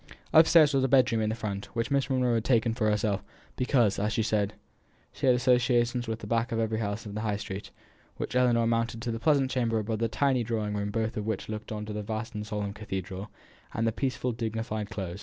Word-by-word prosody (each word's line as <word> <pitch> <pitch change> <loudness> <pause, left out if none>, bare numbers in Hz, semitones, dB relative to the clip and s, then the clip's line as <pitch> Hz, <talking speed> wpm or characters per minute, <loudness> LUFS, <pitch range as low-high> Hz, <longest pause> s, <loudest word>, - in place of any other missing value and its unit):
Upstairs 160 -2 +7
was 135 -1 +2
a - - +3
bedroom 125 -4 +4
to 110 - +1
the 110 - -1
front, 100 -3 -4
which 115 +3 -1
Miss 140 -2 +1
Monro 125 -2 +2
had 115 -1 +1
taken 115 -2 +2
for 110 -2 +1
herself, 105 -1 0 0.3
because 120 -6 +2
as 105 +2 0
she 110 +1 +1
said, 105 -1 0 0.6
she - - -2
had 125 - +7
old - - +2
associations 120 -1 +2
with 110 -1 -2
the - - -6
back 115 +1 0
of 115 - -1
every 110 -1 0
house 105 0 -3
in 105 - -7
the 110 - -3
High 105 -2 -1
street, 95 -1 -6 0.5
while - - -1
Ellinor 120 -2 +3
mounted 115 0 0
to 120 - -1
the 115 - -3
pleasant 140 -2 +2
chamber 120 -3 +1
above 110 0 -2
the 115 - +1
tiny 130 +1 +1
drawing 110 -2 -2
room 100 0 -2
both 110 +2 -2
of 105 0 -3
which 110 -2 -3
looked 110 0 -6
on 105 -1 -4
to 105 - -6
the 105 - -3
vast 110 +2 -4
and 105 0 -5
solemn 105 -2 -3
cathedral, 95 -1 -5 0.5
and 115 - 0
the 115 - +2
peaceful 125 +1 -1
dignified 110 -2 -3
Close. 95 -3 -5
115 Hz, 235 wpm, -28 LUFS, 105-120 Hz, 0.6 s, Upstairs